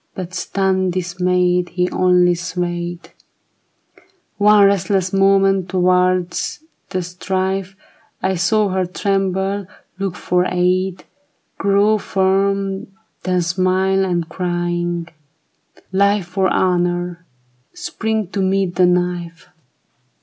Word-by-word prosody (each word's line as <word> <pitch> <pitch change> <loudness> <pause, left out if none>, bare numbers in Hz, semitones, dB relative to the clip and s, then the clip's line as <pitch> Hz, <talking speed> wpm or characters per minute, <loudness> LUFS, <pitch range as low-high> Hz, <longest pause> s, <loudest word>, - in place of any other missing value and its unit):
But 180 -1 -6
stunned, 190 0 0
dismayed, 180 0 0
He 180 0 0
only 180 -1 +3
swayed 175 -1 -4 1.3
One 210 0 +6
restless 195 -1 +1
moment 195 -1 +3
towards 180 - +1 0.3
the 185 -2 -2
strife: 190 +2 -3 0.4
I 190 - 0
saw 200 +4 +2
her 185 -1 -1
tremble, 195 +1 -1 0.3
look 195 -3 -2
for 180 0 0
aid, 185 +1 0 0.6
Grow 200 +2 +3
firm, 195 +1 0 0.3
then 180 -1 0
smile, 185 +2 +1
and 175 -3 -1
crying, 175 -1 -2 0.4
" - - -30
Life 200 0 +2
For 190 0 +1
honor! 175 -2 0 0.2
" - - -39 0.3
spring 220 - -2
to 195 0 -2
meet 190 -2 0
the 180 -1 +5
knife. 175 -1 -2
185 Hz, 105 wpm, -19 LUFS, 180-195 Hz, 1.3 s, One